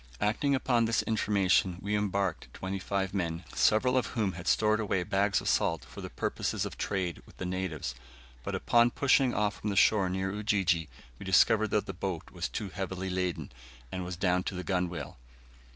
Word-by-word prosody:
Acting 135 +7 +1
upon 120 -3 +2
this 115 0 +1
information, 100 -4 +2
we 105 +2 -1
embarked 100 -3 -1
twenty 95 +1 -4
five 95 0 -2
men, 85 -3 -2
several 125 +4 +3
of 130 - +2
whom 105 -4 +1
had 85 0 -8
stored 110 0 +3
away 95 -4 0
bags 100 +2 +1
of - - -6
salt 80 -3 +1
for - - -10
the - - -6
purposes - - -2
of - - -6
trade 95 -4 -2
with - - -18
the 95 - -4
natives; 90 -7 -3 0.5
but - - -3
upon 120 0 +4
pushing 130 0 +3
off 105 -1 0
from 105 - -2
the 100 - -2
shore 100 -1 +4
near 95 +1 -1
Ujiji, 95 -6 +1 0.3
we - - -8
discovered 110 +3 +4
the 105 -2 -1
boat 90 -2 -4
was 90 -1 -3
too 105 -3 -4
heavily 95 0 -4
laden, 90 -5 -2 0.4
and 95 - -3
was 90 -1 -5
down 90 0 +2
to 95 - -3
the 90 - -4
gunwale. 90 -8 -2
95 Hz, 185 wpm, -30 LUFS, 90-105 Hz, 0.5 s, upon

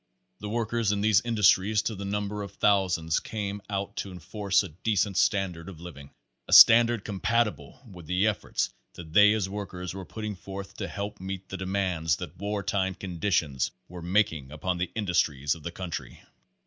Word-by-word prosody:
The 105 - -6
workers 115 -1 0
in 100 -1 -1
these 105 -2 +4
industries 105 -2 +3
to 110 - -2
the 100 -1 -6
number 105 +1 -3
of 100 -1 -7
thousands 90 -6 +2
came 105 -2 -5
out 100 -1 -3
to 100 - -4
enforce 95 +3 0
a 95 - -7
decent 100 +4 -1
standard 90 -4 0
of 90 -5 -11
living, 75 -5 -10 0.4
a - - -2
standard 115 -1 +8
compatible 115 +5 -1
with 90 -6 -12
the 90 +3 +1
efforts 105 -2 -1 0.2
that 80 -2 -11
they 105 +1 +7
as 105 -3 0
workers 95 -3 -6
were 95 0 -6
putting 105 +5 -6
forth 95 +2 -8
to - - -3
help 100 +1 -5
meet 95 0 -6
the - - -5
demand 95 -4 -2
that 90 -3 -8
wartime 100 -1 -1
conditions 85 -7 -1 0.2
were 90 0 -9
making 85 -7 0
upon 90 +4 -2
the 90 - -1
indus 95 -6 +1
tries 70 -2 0
of 80 - -10
the 85 - -5
country. 85 -1 -7
95 Hz, 175 wpm, -27 LUFS, 90-105 Hz, 0.4 s, standard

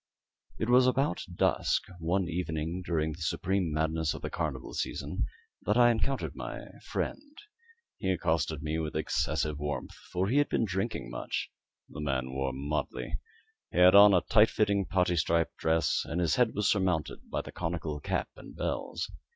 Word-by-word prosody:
It 110 - -1
was 125 +1 +6
about 135 +3 +1
dusk, - - +2 0.2
one 90 +3 0
evening 85 0 -2
during 80 -3 0
the 80 - -9
supreme 90 +3 0
madness 80 0 0
of - - -9
the - - -3
carnival - - -3
season, - - -2 0.3
that 105 - +1
I 120 -1 +7
encountered 130 +4 -1
my - - -6 0.2
friend. 290 +1 -4 0.6
He 95 - -1
accosted 80 -4 0
me 80 +1 -1
with 80 -1 -3
excessive 75 -1 0
warmth, 75 0 -3 0.2
for 90 +1 0
he 130 +7 +3
had 145 - +2
been 115 - +1
drinking 95 - -3
much. - - -3 0.4
The 75 - -8
man 65 -3 -1
wore 65 0 -1
motley. 70 +4 -3 0.5
He - - -5
had 90 +1 +8
on 100 0 +9
a 90 - +4
tight 110 0 +5
fitting 100 -2 +1
parti 90 -2 +2
striped 85 +1 +1
dress, 80 +1 +2
and 80 +2 -3
his 85 -3 +2
head 125 -3 +2
was 105 -1 +1
surmounted 90 -6 0
by - - -1
the - - -9
conical 80 -3 -3
cap - - -2
and - - -12
bells. - - -3
85 Hz, 170 wpm, -30 LUFS, 80-100 Hz, 0.6 s, on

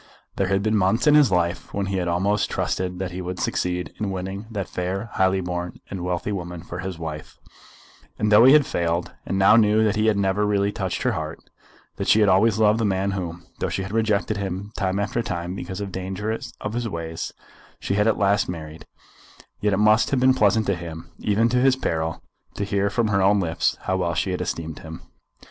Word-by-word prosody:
There 95 - +1
had 95 +1 +1
been 110 0 +1
months 100 +4 +2
in 150 - +6
his 150 -3 +6
life 85 0 0
when 100 -1 0
he 95 0 -2
had 90 -1 -1
almost 95 +4 +1
trusted 90 -1 -2
that 95 0 -4
he 90 +1 -5
would 90 0 -5
succeed 90 0 -2
in 105 - -1
winning 95 +2 -5
that 100 -6 -4
fair, 95 +5 -4
highly 95 0 +2
born, 90 -1 -4
and 95 -3 -4
wealthy 90 +2 -2
woman 85 -3 -5
for 85 -1 -7
his 95 -1 -5
wife; 80 -2 -7 0.8
and 105 0 0
though 105 +2 +8
he 135 - +8
had 150 -2 +6
failed, 85 - -1 0.2
and 95 - -1
now 95 +2 +6
knew 110 0 +4
that 110 -1 +2
he 110 +1 +1
had 105 -2 +3
never 100 +1 +1
really 100 -1 +1
touched 95 -4 -3
her - - +2
heart, - - -5 0.5
that - - -3
she 110 - +5
had 105 -2 +5
always 100 +3 +4
loved 110 0 +4
the - - 0
man 100 -1 0
whom, 85 -3 -5
though - - -1
she 95 - -2
had 95 - -7
rejected 110 -1 +1
him 100 +1 -4
time 95 -2 -1
after 105 +3 -1
time 90 -4 -4
because 95 0 -6
of 100 -1 -4
the 95 - -5
dangers 105 +6 -4
of 105 - -4
his 120 -1 -2
ways, 80 -3 -5 0.5
she - - -2
had 105 +2 +2
at 110 - +2
last 100 -1 +2
married, 80 -2 -7 0.7
yet 105 - +1
it - - +2
must 105 +2 +4
have 135 - +1
been 130 +1 +5
pleasant 110 -2 +3
to 100 - +1
him, 85 -1 -8
even 105 +1 +1
in 125 +2 +3
his 135 0 +4
peril, 80 -9 -2 0.3
to - - -2
hear 100 0 0
from 110 +1 0
her 100 -1 +2
own 100 +2 +4
lips 85 -2 0
how 95 - -1
well 85 -2 -1
she 95 +3 0
had 90 - -2
esteemed 80 -1 -4
him. 80 0 -9
95 Hz, 225 wpm, -23 LUFS, 90-105 Hz, 0.8 s, though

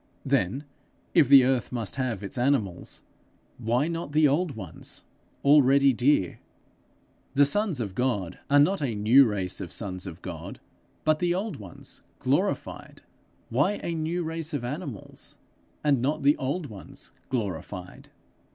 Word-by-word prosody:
Then, 100 +10 +1 0.5
if 145 - +5
the 135 -2 +9
earth 130 -2 0
must 115 -5 -2
have 125 -7 -2
its 100 - -4
animals, 120 -8 -1 0.6
why 120 +5 +1
not 165 -3 -4
the 155 0 +5
old 150 +2 0
ones, 95 -7 -6 0.4
already 140 -1 +6
dear? 120 - +1 1.0
The 145 +1 +6
sons 180 +1 +1
of 105 -5 -3
God 100 -7 -1
are 145 +1 +6
not 180 +5 +3
a 125 -6 -1
new 115 +7 +6
race 95 -3 -2
of 90 - -6
sons 95 -3 -3
of 85 -1 -9
God, - - -7 0.4
but 155 0 +2
the 175 0 +1
old 200 - -3
race 95 -4 -10 0.2
glorified: - - -2 0.5
why 145 - +2
a 170 - -2
new 165 +2 -2
race 160 -1 -3
of 135 - -3
animals, 140 - -7 0.5
and 140 -5 +3
not 140 +3 -1
the 145 +2 +5
old 140 +6 -2
ones 105 -8 -8 0.2
glorified? 95 -6 -5
135 Hz, 145 wpm, -27 LUFS, 105-150 Hz, 1.0 s, the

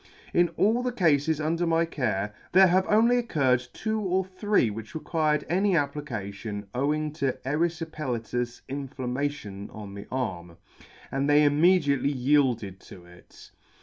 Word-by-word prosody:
In 175 0 +4
all 225 +4 +3
the 250 0 -1
Cafes 160 - +2
under 165 +3 0
mv 165 0 +1
care, 105 -6 -1 0.2
there 190 +1 +8
have 185 +1 +3
only 230 +4 +4
occurred 130 - +1
two 220 0 -2
or 190 -2 0
three 190 - +1
which 110 +4 -8
required 155 -1 0
any 185 +2 +2
application 110 -8 -4
owing 150 +4 0
to 140 -4 -1
eryfipelatous 135 -6 -2
inflam 135 -2 -5
mation 125 -8 -4
on 105 -2 -9
the 100 +1 -9
arm, 90 -10 -4 0.5
and 135 +1 0
they 145 +1 +6
immediately 145 -2 +3
yielded 125 -8 +1
to 90 -2 -14
it. 90 0 -17
145 Hz, 140 wpm, -27 LUFS, 120-170 Hz, 0.5 s, there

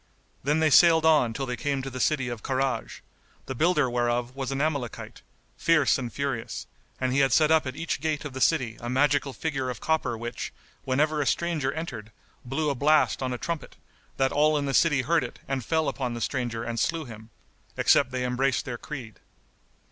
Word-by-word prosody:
Then 150 +4 +1
they 155 -1 +3
sailed 160 +2 +6
on 150 -7 +4
till 135 +5 -3
they 125 -1 -3
came 135 +2 -2
to 135 - -5
the 130 - -6
city 135 -2 +1
of 120 -3 -5
Karaj, 135 0 -2 0.4
the 130 - -4
builder 150 0 +2
whereof 120 0 -1
was 135 -1 -3
an 135 - -2
Amalekite, 140 -5 -3 0.4
fierce 155 -4 +3
and 120 -2 -4
furious; 135 -5 -3 0.3
and 130 -1 0
he 140 - +2
had 135 -2 +3
set 155 +3 +4
up 160 -3 +4
at 130 - -5
each 165 -3 -3
gate 155 -2 -2
of 145 - -6
the 130 - -5
city 125 -9 +2
a 120 - -5
magical 140 +2 +2
figure 135 -3 -3
of 125 -4 -5
copper 155 -6 0
which, 120 +1 -5 0.3
whenever 150 +3 +1
a 140 - -1
stranger 165 -6 0
entered, 120 -10 -6 0.3
blew 145 +4 -1
a - - 0
blast 150 +4 +3
on 130 -1 -1
a 125 - -2
trumpet, 165 +2 -5 0.4
that 135 0 +2
all 150 +1 +3
in 145 - -1
the 135 - -2
city 145 -3 +3
heard 165 +2 +2
it 120 - -7
and 135 -2 -2
fell 160 +6 0
upon 125 -3 -2
the - - -5
stranger 120 -4 -2
and 115 -1 -3
slew 165 +3 0
him, 110 -2 -11 0.5
except - - +4
they 125 -1 -2
embraced 125 +1 0
their 120 -3 -5
creed. 125 -8 -8
135 Hz, 205 wpm, -26 LUFS, 125-155 Hz, 0.5 s, sailed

